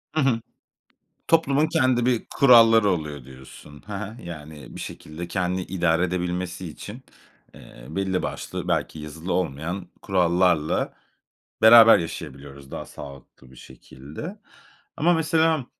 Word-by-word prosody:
Hı 155 - +2
hı. 120 -4 +1 0.9
Toplumun 155 -2 +3
kendi 130 -5 +1
bir 125 -3 +1
kuralları 115 -5 +6
oluyor 75 -6 -3
diyorsun, 65 +2 -14
he 105 - -7
he, 105 +4 -7
yani 75 -4 -10
bir - - -8
şekilde 80 +3 -8
kendini 90 0 -2
idare 85 -2 0
edebilmesi 90 0 -3
için, 105 - -10 0.5
eee, - - -14
belli 95 +2 -1
başlı - - -5
belki 80 - -1
yazılı 80 +4 -5
olmayan 85 +2 -3
kurallarla 90 -4 +1 0.7
beraber 115 0 +9
yaşayabiliyoruz 70 -4 -8
daha - - -6
sağlıklı 70 -2 -13
bir - - -16
şekilde. 75 - -10 0.6
Ama 175 +3 +3
mesela, 160 -2 +1
90 Hz, 120 wpm, -24 LUFS, 75-115 Hz, 0.9 s, beraber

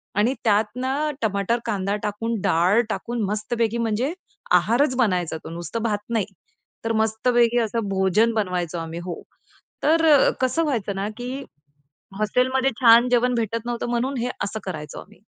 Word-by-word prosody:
आणि 215 +6 +2
त्यातनं 250 +7 +1
टमाटर, 210 +2 0
कांदा 200 -3 -1
टाकून 215 +2 -2
डाळ 180 +8 +3
टाकून 235 +1 -3
मस्तपैकी 220 +3 -1
म्हणजे 230 +6 0 0.4
आहारच 235 - +3
बनायचा 180 -9 +1
तो - - -6
नुसतं 175 +7 -5
भात 210 -3 0
नाही. 225 -4 0 0.6
तर 225 - 0
मस्तपैकी 230 +2 +2
असं 225 -1 -1
भोजन 195 +4 +2
बनवायचो 180 -5 -1
आम्ही 165 +1 -5
हो. 175 -2 -5 0.6
तर 315 -2 +5
कसं 260 +6 +1
व्हायचं 220 -9 -1
ना, 195 +1 -2
की 255 +3 -5 0.8
हॉस्टेलमध्ये 260 +5 +1
छान 235 +1 +7
जेवण 245 0 +2
भेटत 230 0 -2
नव्हतं 240 0 -3
म्हणून 250 +3 -1
हे 245 - -1
असं 220 +2 -3
करायचो 155 -6 -6
आम्ही. - - -15
225 Hz, 145 wpm, -23 LUFS, 200-245 Hz, 0.8 s, छान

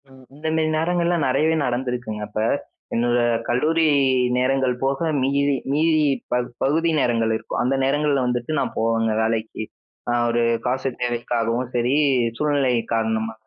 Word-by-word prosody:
ம். 130 -1 -17
இந்த 155 +2 -6
மேரி 160 -1 +1
நேரங்கள்லாம் 170 -1 +1
நிறையவே 155 +5 +2
நடந்திருக்குங்க 125 -3 -3
அப்ப. 110 - -3 0.5
என்னோட 120 +1 +2 0.3
கல்லூரி 155 +7 +2 0.5
நேரங்கள் 130 0 +1
போக 135 0 0 0.2
மீதி 140 +2 +1 0.2
மீதி 155 +1 +3 0.3
ப 125 - +2 0.3
பகுதி 160 +5 +2
நேரங்கள் 115 -3 +1
இருக்கும். - - -4
அந்த 130 +2 +1
நேரங்கள்ல 145 0 +1
வந்துட்டு 125 +2 -2
நான் - - -2
போவேங்க 115 0 +1
வேலைக்கு. 110 0 -2 0.4
நான் 120 0 +1
ஒரு 120 0 +1 0.2
காசு 130 +2 -1
தேவைக்காகவும் 120 0 -1
சரி 120 +2 +1 0.4
சூழ்நிலை 145 -4 +1 0.2
காரணமா. 110 0 -1
125 Hz, 135 wpm, -22 LUFS, 120-145 Hz, 0.5 s, மீதி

